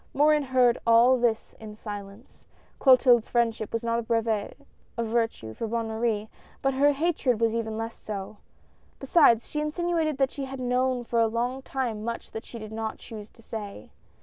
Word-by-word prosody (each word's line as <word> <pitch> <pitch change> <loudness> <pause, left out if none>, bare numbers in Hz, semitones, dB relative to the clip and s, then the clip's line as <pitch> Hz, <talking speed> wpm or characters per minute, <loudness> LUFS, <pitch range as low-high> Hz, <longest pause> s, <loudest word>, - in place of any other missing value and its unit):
Morin 300 +2 +4
heard 255 -3 +3
all 235 +3 +6
this 230 -2 0
in 215 -1 -9
silence. 205 +1 -9 0.4
Clotilde's 255 -3 +5
friendship 230 -3 0
was 230 0 -2
not 230 0 0
a - - -1
brevet 225 -2 -1 0.4
of 235 - 0
virtue 225 - -1
for 225 - -4
Bonne 230 0 -2
Marie, 220 -1 -1 0.4
but 270 0 +2
her 285 +2 +4
hatred 285 -6 0
was 230 -1 +2
even 220 -1 -2
less 225 0 -5
so. 205 0 -6 0.6
Besides, 270 -5 +4
she 300 - -3
insinuated 315 -1 -1
that 270 -1 +1
she 275 - -5
had 265 0 -7
known 250 0 0
for 235 0 -1
a 225 - +4
long 240 +4 -2
time 245 -6 -3
much 235 +1 -5
that 220 - -7
she 235 - -9
did 215 -1 -8
not 220 0 -4
choose 215 -2 -10
to 230 - -21
say. 210 -3 -7
235 Hz, 180 wpm, -27 LUFS, 220-260 Hz, 0.6 s, all